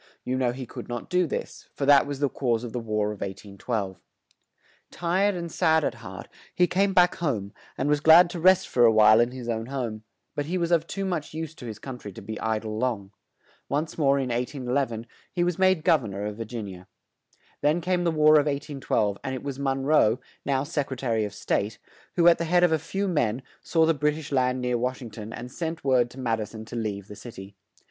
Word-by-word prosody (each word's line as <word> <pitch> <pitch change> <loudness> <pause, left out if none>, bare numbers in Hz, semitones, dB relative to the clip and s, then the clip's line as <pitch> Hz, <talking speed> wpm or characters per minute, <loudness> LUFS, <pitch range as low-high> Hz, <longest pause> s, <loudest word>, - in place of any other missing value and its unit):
You 125 - -2
know 130 -2 +1
he 130 +1 -6
could - - -9
not 120 -1 -5
do 180 -1 +3
this, - - -6
for 140 - -2
that 140 0 +6
was 145 -1 -4
the 145 - +2
cause 120 -4 -1
of 120 - -6
the 125 - -2
War 105 -2 -1
of 105 - -9
1812. 100 0 -4 0.9
Tired 185 +4 +1
and 170 -1 -5
sad 160 0 +3
at - - 0
heart, - - -9 0.3
he 180 - +5
came 195 +3 +1
back 180 -1 +4
home, 115 - -2 0.2
and 135 - -1
was 150 0 +3
glad 160 +4 +8
to 175 - -5
rest 185 +2 +5
for 120 - +2
a 115 - +7
while 110 0 +6
in 120 0 +3
his 125 -1 -8
own 115 -1 -2
home; 120 -5 -4 0.3
but 145 0 -3
he 180 +3 -1
was 170 -1 -1
of 165 -1 +2
too 195 0 -3
much 170 -5 -3
use 160 -1 -4
to 125 -6 -10
his 110 -2 -6
coun 130 +1 -8
try 105 - -8
to 100 - -10
be 110 +2 -6
i 110 -1 0
dle 110 0 -5
long. 110 -6 -2 0.6
Once 150 +3 -1
more, 140 -3 +3
in 135 -2 -1
1811, 125 -1 -2 0.3
he 175 - 0
was 175 0 -1
made 185 -4 +3
Gov 160 -7 +4
ern 100 -3 -6
or 100 +1 -3
of 105 0 -5
Vir 115 - -4
gin 110 -2 -6
i 95 - -8
a. 90 - -17 0.8
Then 150 +4 +2
came 180 0 0
the 170 - +2
War 155 -1 +6
of 145 - 0
1812; 140 -8 -1
and 130 -1 -3
it 130 - -7
was 140 -1 -5
Mon 135 -1 -1
roe, 135 -5 +4 0.2
now 135 -1 0
Sec 145 -2 -2
re 130 - -5
ta 130 -1 -3
ry 115 - +2
of 105 -2 -2
State, 105 +1 -1 0.4
who, 175 -1 +4
at 170 - +6
the 170 - -1
head 175 +2 +3
of 175 - +4
a 160 - +2
few 195 +6 -3
men, 130 - 0 0.2
saw 165 -1 +2
the 165 - +3
Brit 150 0 0
ish 155 -2 -8
land 130 -1 +1
near 125 -1 0
Wash 125 +2 -2
ing 115 - -8
ton 110 0 -8
and 125 +2 -7
sent 165 +2 -4
word 130 -3 +3
to 130 - -12
Mad 115 -3 0
i - - -2
son 110 +1 -10
to 115 - -9
leave 105 -4 -3
the 105 - -10
cit 120 +2 -11
y. 95 +1 -9
130 Hz, 250 wpm, -26 LUFS, 115-160 Hz, 0.9 s, glad